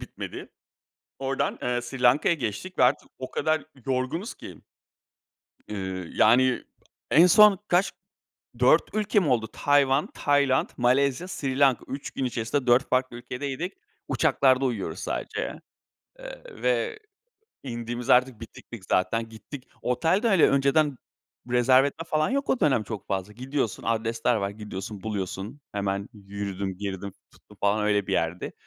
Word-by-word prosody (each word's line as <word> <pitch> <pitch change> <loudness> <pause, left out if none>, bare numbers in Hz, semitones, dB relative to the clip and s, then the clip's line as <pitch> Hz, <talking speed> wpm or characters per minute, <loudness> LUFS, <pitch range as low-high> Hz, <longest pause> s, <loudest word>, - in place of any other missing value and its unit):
bitmedi. - - -8 0.7
Ordan, 135 0 -1
eee, 125 0 0
Sri 125 +1 -7
Lanka'ya 130 +7 +4
geçtik 140 - -5
ve 125 - +6
artık - - +1
o 130 - -6
kadar 155 -2 0 0.2
yorgunuz 135 - -2
ki. - - -11 1.1
Iıı, 95 -4 -5
yani, 125 +3 +4 0.5
en 165 +4 +7
son 205 +2 +7
kaç 180 +3 +2 0.7
4 - - +5
ülke 210 -1 +2
mi 170 - 0
oldu? 115 -4 +1
Tayvan, 145 0 +2
Tayland, 140 -2 +2
Malezya, 130 +6 +2
Sri 135 -7 -3
Lanka. 135 -3 +3
3 135 +1 -5
gün 135 - -3
içerisinde 125 +2 -2
4 125 +2 +4
farklı 130 -1 0
ülkedeydik. 140 +8 -5 0.4
Uçaklarda 135 -3 +3
uyuyoruz 100 -9 -2
sadece. - - -4 0.6
Eee, - - -9 0.2
ve 465 -3 0 0.6
indiğimiz 120 -1 -5
de - - +8
artık 125 -2 +1
bitiktik 115 -2 -11
zaten, 115 +5 +1
gittik. 115 +5 -11
Otel 160 - +1
de, 235 - +2
hani, 190 -6 +5
önceden 140 +1 +2 0.5
rezerve 130 +2 +5
etme 150 +3 -5
falan 155 +4 +1
yok 275 +1 -1
o 260 - +1
dönem 130 -7 +3
çok 105 0 -7
fazla. 95 +1 -3
Gidiyorsun, 130 -1 -3
adresler 115 +1 0
var. 100 -2 -1
Gidiyorsun, 100 -1 -7
buluyorsun. 105 +4 -5
Hemen 100 0 -2
yürüdüm, 100 -2 -5
girdim, 100 0 -5 0.2
tuttum - - -20
falan 105 +1 +2
öyle 105 -2 +1
bir 95 - -3
yerdi. 85 0 -1
125 Hz, 140 wpm, -26 LUFS, 105-145 Hz, 1.1 s, de